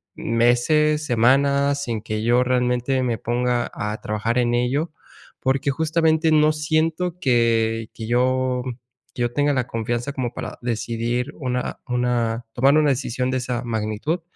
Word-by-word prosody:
meses, 150 +7 +2
semanas, 140 +3 +2
sin 115 -3 -3
que 110 0 -4
yo 120 +2 +3
realmente 125 +1 +1
me 120 -3 -1
ponga 120 0 0
a 105 +1 -4
trabajar 110 +3 -1
en 120 0 +1
ello, 135 +7 0 0.5
porque 135 +1 0
justamente 160 +1 +2
no 155 0 +5
siento 160 +3 -1
que 115 -5 +1
que 110 - -7
yo 125 +1 +1 0.5
que 120 - -5
yo 120 0 -1
tenga 145 0 +2
la 125 -1 -1
confianza 120 +2 -2
como 125 -3 -3
para - - -6
decidir 120 +3 -2
una 125 -3 -3
una 120 -2 0
tomar 135 +4 +4
una 150 -2 +4
decisión 125 -1 -2
de 130 - 0
esa 125 0 -3
magnitud 110 +9 -2
125 Hz, 145 wpm, -22 LUFS, 120-140 Hz, 0.5 s, no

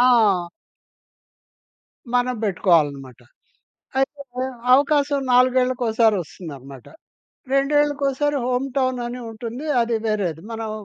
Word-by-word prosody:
ఆ! 215 -8 +4 1.7
మనం 250 0 +1
పెట్టుకోవాలనమాట. 145 - +1 0.8
అయితే 280 +2 -1 0.5
అవకాశం 285 0 +2
నాలుగేళ్లకోసారి 250 -3 +3
ఒస్తుందనమాట. 140 -6 -11 0.7
రెండేళ్లకోసారి 290 0 +1
హోమ్ 250 +2 0
టౌన్ 255 -1 +1
అని 245 +1 -6
ఉంటుంది 230 +5 -7 0.2
అది 230 0 +1
వేరేది. 180 -7 -1
మనం 225 -1 -4
245 Hz, 85 wpm, -22 LUFS, 200-270 Hz, 1.7 s, ఆ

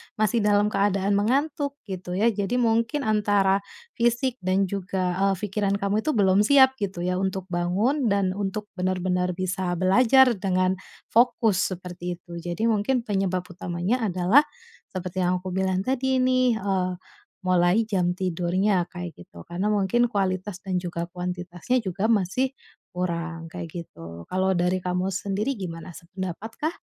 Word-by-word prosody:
masih 215 +2 +2
dalam 205 0 +3
keadaan 200 0 +1
mengantuk, 280 +6 0 0.2
gitu 185 -1 -5
ya. 210 +6 +3
Jadi 220 +3 -1
mungkin 230 +5 +1
antara 205 -4 +2 0.3
fisik 240 +2 +1
dan 190 +1 +2
juga, 185 -2 -2
eee, 195 - +3
fikiran 200 -1 0
kamu 200 +2 0
itu 310 - +2
belum 195 -2 +4
siap, 265 -1 +6
gitu 190 -3 -3
ya, 180 +1 0
untuk 190 0 -2
bangun 195 +11 0
dan 200 -2 +2
untuk 205 +1 -3
bener-bener 180 0 0
bisa 185 0 -2
belajar 235 +6 +5
dengan 185 -1 +1 0.3
fokus, 225 -5 +3
seperti 180 0 -6
itu. 170 -1 -9
Jadi 175 +5 -4
mungkin 225 +4 +1
penyebab 195 -4 -1
utamanya 180 +6 -2
adalah 190 +10 +4 0.5
seperti 185 -1 -5
yang 180 0 +1
aku 185 - -5
bilang 190 0 0
tadi 260 +3 0
nih, 255 -3 +2
eee, 190 -2 0 0.5
mulai 185 +4 +3
jam 180 -4 +1
tidurnya 185 +1 +1
kayak 180 -2 -7
gitu, 85 -1 -12
karena 175 +3 -2
mungkin 205 +4 +2
kualitas 190 -3 -2
dan 190 -2 -1
juga 170 -1 -4
kuantitasnya 180 +6 -2
juga 190 +2 -2
masih 230 +5 +1 0.4
kurang, 170 -2 -3
kayak 170 - -6 0.2
gitu, 85 - -11
kalau 190 +1 +2
dari 180 +1 +1
kamu 180 +1 -1
sendiri 200 +6 -1
gimana 170 -1 -6
sependapat 185 +5 -7
kah? 315 +3 -2
190 Hz, 145 wpm, -25 LUFS, 180-215 Hz, 0.5 s, siap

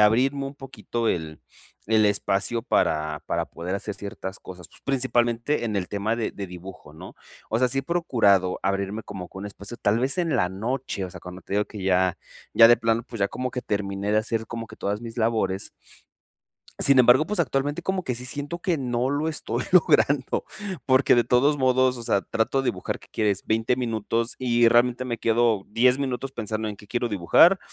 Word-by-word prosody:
abrirme 130 +6 +3
un 135 - -8
poquito 120 -4 -4
el 80 -2 -3 0.5
el 110 -1 +4
espacio 105 +3 0
para 75 -1 0
para - - -1
poder 90 +3 -5
hacer 100 0 -4
ciertas 100 -1 -7
cosas. 90 -3 -11
Pues, - - -20
principalmente 120 0 0
en 110 -3 -2
el 95 -3 -2
tema 105 +2 -1
de 115 -1 -2
de 100 -1 -6
dibujo 90 -3 -11
¿no? 90 +4 -12 0.3
O 115 - +1
sea, 125 - +3
sí 135 +2 -2
he - - 0
procurado 105 - +2
abrirme 100 +2 -1
como 95 -3 -7
con 95 - -10
un - - -5
espacio, 100 +3 -9
tal 105 +2 +3
vez 130 +7 -1
en 165 -6 +1
la 90 -5 +2
noche, 110 +1 -3
o 90 - -7
sea, - - -10
cuando 90 0 -10
te 100 - -5
digo 105 - +2
que 105 -3 -9
ya 95 -1 +2 0.4
ya 115 - +9
de 120 - +7
plano, 115 0 0
pues, 115 -1 -9
ya 100 - +2
como 125 +5 -4
que 125 0 -4
terminé 100 0 -2
de 110 - +4
hacer 110 0 -2
como 115 -1 -6
que - - -12
todas 100 +1 -2
mis 115 0 -8
labores. 110 -4 0 1.1
Sin 140 -1 +5
embargo, 125 +5 +6
pues, 210 +4 -3
actualmente 145 0 -1
como 190 -1 -1
que 125 - -2
sí 125 +2 -7
siento 145 +6 -4
que 175 -5 0
no 125 0 -1
lo 150 +3 0
estoy 155 - -3
logrando, 145 -6 +3 0.4
porque 130 0 +4
de 120 -1 +3
todos 140 +5 +3
modos, 130 -1 +2
o - - -7
sea, 100 -3 +1
trato 125 +4 0
de - - -4
dibujar, 90 - -2
¿qué - - -19
quieres? 105 -3 0
20 110 +3 +1
minutos, 115 -1 -1
y 120 -2 +3
realmente 120 +1 +3
me 120 -2 -3
quedo 115 -3 +2
10 125 +4 +3
minutos 135 -1 -3
pensando 110 -1 -3
en 105 - -6
qué 105 - -15
quiero 120 +2 -1
dibujar, 110 - +5
115 Hz, 205 wpm, -25 LUFS, 100-130 Hz, 1.1 s, ya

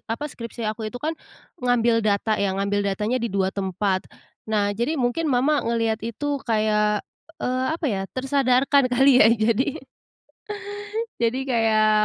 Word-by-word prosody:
apa, 230 +7 -3
skripsi 235 -4 -7
aku 220 0 -5
itu 245 - -8
kan, 305 +5 -2 0.5
ngambil 240 -2 +2
data 215 0 +1
ya, 200 - +2
ngambil 200 +1 0
datanya 215 +5 -1
di 235 - -1
2 190 0 0
tempat. 190 0 -1 0.4
Nah, 205 -2 +1
jadi 240 +10 -1
mungkin 265 +5 0
mama 280 +3 +2
ngelihat 230 -1 0
itu 280 +6 -3
kayak, 210 -1 +1 0.4
eee, 255 +1 -1
apa 335 - -8
ya, 195 - -2 0.2
tersadarkan 270 0 +3
kali 265 +3 +5
ya. 220 - +8
Jadi 230 +4 +1 1.4
jadi 240 +3 0
kayak, 220 -2 +3
230 Hz, 145 wpm, -23 LUFS, 210-255 Hz, 1.4 s, ya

